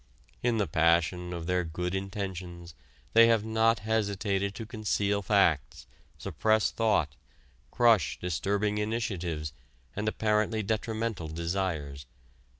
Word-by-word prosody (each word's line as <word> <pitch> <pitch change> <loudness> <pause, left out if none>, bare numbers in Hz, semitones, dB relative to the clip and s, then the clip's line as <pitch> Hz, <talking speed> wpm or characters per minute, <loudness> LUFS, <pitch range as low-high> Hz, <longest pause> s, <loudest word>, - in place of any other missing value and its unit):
In 120 -2 +1
the 105 - +2
passion 85 +1 +2
of 85 -2 -5
their 90 +1 +1
good 90 +2 -4
intentions 95 -3 -5 0.4
they 115 0 +8
have 115 -2 +3
not 110 +1 +3
hesitated 100 -2 -1
to 115 - -6
conceal 105 -2 -1
facts, 95 - +1 0.3
suppress 110 -1 +1
thought, 95 -11 +1 0.5
crush 115 - +3
disturbing 100 +5 -1
initiatives 90 -9 -2 0.4
and 105 +1 -3
apparently 110 0 +1
detrimental 110 -3 -2
desires. 80 -5 -3
100 Hz, 110 wpm, -29 LUFS, 85-110 Hz, 0.5 s, they